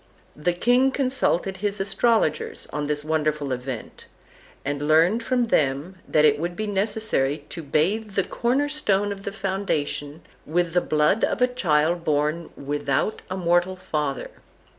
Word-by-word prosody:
The 175 +4 0
king 245 +8 +3
consulted 255 -9 0
his 205 +1 -2
astrologers 200 -3 +1
on 150 0 -2
this 150 0 -1
wonderful 155 -2 0
event, 125 -2 -5 0.6
and 145 +1 -2
learned 165 +9 +4
from 245 +1 +1
them 145 +5 +1
that 155 0 +4
it 145 -1 +4
would 175 +2 -3
be 215 - -3
necessary 200 -9 0
to 170 - -6
bathe 195 +9 0
the 195 - +3
corner 260 +9 0
stone 205 -9 0
of 200 0 -7
the 200 - -2
foundation 190 -7 -3 0.2
with 170 +1 0
the 180 - +3
blood 155 +8 +2
of - - +1
a 250 - +5
child 170 -7 +1
born 155 +2 0
without 140 +6 -1
a 185 - -3
mortal 175 +1 +2
father. 150 -7 -3
175 Hz, 150 wpm, -24 LUFS, 150-205 Hz, 0.6 s, a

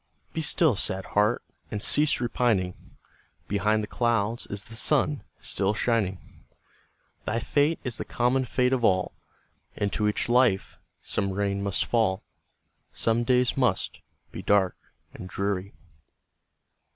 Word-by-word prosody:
Be 160 - -2
still, 160 - +3
sad 95 0 -2
heart! 105 +3 +2 0.3
and 105 - -3
cease 150 +8 +3
repining; 115 -6 -1 0.5
Behind 105 +1 +1
the - - -4
clouds 115 -1 0
is 100 0 -3
the 115 - -11
sun 145 +4 +2 0.2
still 100 +2 0
shining; 105 -6 -2 0.8
Thy 115 +2 0
fate 145 +6 +1
is 125 -3 -1
the - - -2
common 125 +2 +1
fate 125 +2 +1
of 125 -2 0
all, 95 -4 +2 0.6
Into 105 +1 0
each 105 - 0
life 120 -5 +2 0.2
some 100 -2 -1
rain 100 0 -1
must 100 -1 0
fall, 110 -5 +1 0.7
Some 115 +1 +1
days 125 0 +2
must 130 -2 0 0.3
be - - -6
dark 100 -3 +2 0.4
and 90 - -9
dreary. 100 +1 -2
110 Hz, 130 wpm, -27 LUFS, 100-125 Hz, 0.8 s, still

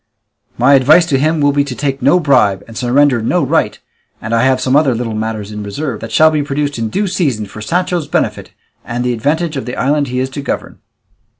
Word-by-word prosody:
My 125 +4 +4
advice 145 +6 +5
to 140 -5 0
him 155 +2 +1
will 145 0 +3
be 140 0 +1
to 140 -3 -6
take 135 +2 -3
no 180 - +4
bribe 105 - +2
and 115 - -12
surrender 125 +1 +2
no 110 - 0
right, - - 0 0.4
and 115 - -5
I 115 - +3
have 130 0 +2
some 130 +1 0
other 140 -4 +3
little 115 -1 -3
matters 110 -1 -4
in 105 0 -6
reserve, 110 +4 -4
that 115 - -7
shall 155 +7 +5
be 155 -1 0
produced 145 -1 -2
in 115 -1 -2
due 205 - -1
season 150 - -1
for 105 +2 -11
Sancho's 175 +3 -1
benefit - - -2 0.3
and 120 0 -4
the 125 0 0
advantage 150 +6 -1
of 135 - -4
the 125 - -4
island 145 +2 0
he 125 0 -3
is 130 +1 -2
to 140 - -5
govern." 140 - -5
135 Hz, 225 wpm, -15 LUFS, 115-150 Hz, 0.4 s, advice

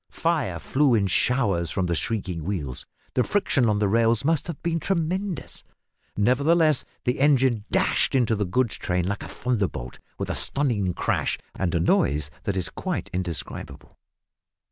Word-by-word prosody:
Fire 150 - 0
flew 135 - +2
in 105 -3 +2
showers 100 -4 +1
from 95 +2 -1
the 85 - 0
shrieking 90 -3 -2
wheels 75 -9 -4 0.3
the 125 - +3
friction 140 - +2
on 105 - +2
the 105 0 +2
rails 115 +3 +2
must 160 0 +2
have 170 -4 -5
been 165 -1 0
tremendous, 180 0 -2 0.5
nevertheless 145 +6 +3 0.2
the 125 +1 0
engine 130 -6 +3
dashed - - +2
into 120 -4 +3
the 105 -1 -1
goods 120 +4 0
train 90 -1 -1
like 100 +1 -2
a - - -6
thunderbolt 100 - -3 0.2
with - - -3
a - - -1
stunning 110 -11 -1
crash - - 0 0.2
and 90 -2 -1
a - - +3
noise 75 -2 +2
that 100 -2 -1
is 90 -3 -2
quite - - -4
indescribable. 90 -2 -5
115 Hz, 160 wpm, -25 LUFS, 90-140 Hz, 0.5 s, the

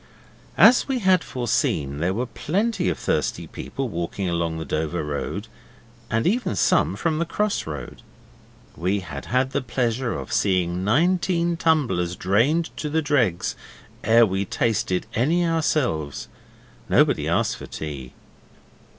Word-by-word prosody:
As 240 +3 +7
we 270 -2 0
had 190 -7 +3
foreseen, 105 - -1
there 85 +3 +1
were 120 +3 -1
plenty 195 - -1
of 85 - -2
thirsty - - -1
people 135 -1 -5
walking 90 0 -3
along 85 -1 -1
the 80 - -5
Dover 80 +3 -2
Road, 75 +8 -4 0.6
and 115 0 0
even 235 +7 +1
some - - +2
from 160 -2 -1
the - - +2
cross 210 - -1
road. 75 -2 -7 0.7
We 95 +4 0
had 75 -6 -7
had 130 +2 +1
the - - 0
pleasure 120 0 -1
of - - -6
seeing 90 -2 +1
nineteen 170 - +2
tumblers 135 - +1
drained 120 - +1
to 150 - -3
the 160 +1 0
dregs 125 - +1 0.5
ere 115 +2 +6
we 95 -1 -1
tasted 100 -3 0
any 165 +10 +2
ourselves. 140 - 0 0.6
Nobody - - +3
asked - - +1
for - - -9
tea. 70 -5 -7
115 Hz, 140 wpm, -23 LUFS, -, 0.7 s, As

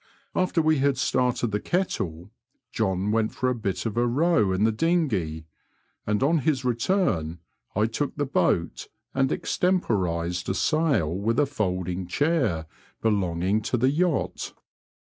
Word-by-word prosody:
After 180 -3 +1
we 155 -2 +3
had 140 0 +2
started 125 -3 +1
the 105 - 0
kettle, 95 - -2 0.4
John 100 -2 0
went 110 0 0
for 130 - 0
a - - +1
bit 100 -5 -3
of 115 -1 -3
a 120 0 +3
row 125 - +2
in 95 +2 +1
the 110 - +4
dinghey, 110 - 0 0.6
and 105 +3 +1
on 160 +4 +3
his 135 -2 0
return 120 - 0 0.4
1 105 +3 +1
took 140 +4 -2
the 145 - -1
boat 90 -10 0 0.3
and 135 +1 +1
extemporised 90 - 0
a 95 - 0
sail 150 - +1
with 110 +7 0
a 145 - +4
folding 90 -8 -2
chair 130 - +1 0.4
belonging 100 -1 +1
to 125 - -1
the 130 +3 +3
yacht. 175 +4 -1
115 Hz, 145 wpm, -25 LUFS, 95-145 Hz, 0.6 s, the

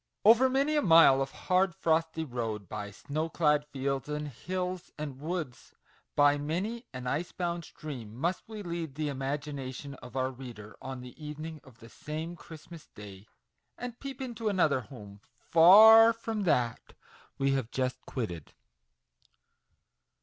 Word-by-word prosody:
OVER 235 +4 +7
many 275 +4 +1
a 295 - +3
mile 165 - +7
of 135 - -1
hard, 185 +3 +1
frosty 160 0 0
road, 115 - -4
by 105 +1 -5
snow 150 +10 -4
clad 150 -3 +2
fields 135 -1 -3
and 150 0 -3
hills 180 +6 -4
and 145 -3 -6
woods, 155 -5 -5 0.4
by 145 0 +4
many 200 - -3
an 125 -1 -7
ice 150 +7 -2
bound 175 -1 -3
stream, 125 -8 -8
must 170 +9 -1
we 215 -2 -7
lead 170 -5 -5
the 150 -1 -2
imagi 140 +2 -3
nation 135 +1 -6
of 125 0 -11
our 130 0 0
reader 120 -5 -10
on 130 -1 -6
the 125 +5 -12
evening 155 +1 -7
of 130 -4 -17
the 115 -2 -14
same 155 +7 -6
Christmas 160 -1 -12
Day, 100 -1 -11 0.5
and 245 -1 -7
peep 275 -1 -7
into 230 -3 -3
another 165 -9 +2
home, 105 -6 -12 0.3
far 220 +7 +9
from 225 -2 -4
that 120 -8 0 0.4
we 135 0 +1
have 135 -4 -1
just 130 0 -2
quitted. 90 - -5
150 Hz, 150 wpm, -30 LUFS, 130-175 Hz, 0.5 s, far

